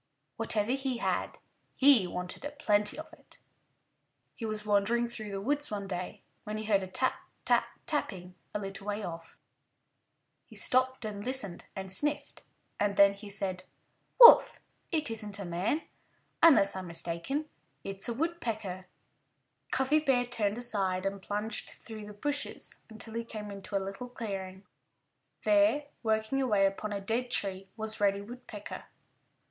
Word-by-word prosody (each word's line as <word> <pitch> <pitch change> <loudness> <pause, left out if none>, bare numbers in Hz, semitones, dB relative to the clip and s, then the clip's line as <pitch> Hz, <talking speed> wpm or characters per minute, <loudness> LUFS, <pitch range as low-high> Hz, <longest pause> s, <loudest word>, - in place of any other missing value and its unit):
Whatever 215 +1 +2
he 265 -2 -1
had, - - -1 0.4
he 260 -9 +6
wanted 180 +6 -6
a 290 - -3
plenty 210 -7 +1
of 315 - -9
it. - - -16 1.0
He 225 - -5
was 215 -1 -4
wandering 210 +4 +2
through 220 -3 -7
the 195 -1 -4
woods 290 +7 0
one 205 -2 -3
day 180 -1 -5 0.2
when 210 0 -4
he 215 - -4
heard 205 -2 +2
a 190 - -5
tap, 255 +8 0 0.2
tap, - - +3 0.2
tapping 190 - -2 0.2
a - - -2
little 195 0 -6
way 205 +1 -2
off. 165 -2 -7 1.1
He - - -15
stopped 255 -1 +2
and 205 -1 -5
listened 245 -9 -2
and 190 -1 -5
sniffed. 290 +7 -1 0.4
And 205 -1 0
then 200 0 +7
he 200 +1 -10
said, 195 -2 -3 0.6
"Woof! 475 -1 +10 0.3
It 305 -7 +1
isn't 210 -2 -1
a 200 - -5
man. 180 - -1 0.6
Unless 270 -13 +7
I'm 185 -1 -5
mistaken 170 - -1 0.4
it's 195 +3 -1
a - - 0
Woodpecker." 225 - -3 0.8
Cuffy 265 +4 +3
Bear 265 -5 +2
turned 220 -3 -1
aside 195 -6 0
and 195 0 -2
plunged 210 +2 -4
through 215 -2 -9
the 210 -1 -11
hushes 290 0 -1
until 220 0 -5
he 230 0 -2
came 210 -3 -7
into 200 0 -7
a - - +5
little 195 +6 -5
clearing. 195 -5 -6 0.8
There, 305 -2 +3
working 220 +4 0
away 210 -7 +3
upon 195 +2 -2
a 200 - -2
dead 230 +5 -2
tree, 195 -4 0
was 220 -1 -2
Reddy 200 0 +3
Woodpecker. 220 -1 -9
210 Hz, 155 wpm, -30 LUFS, 195-250 Hz, 1.1 s, Woof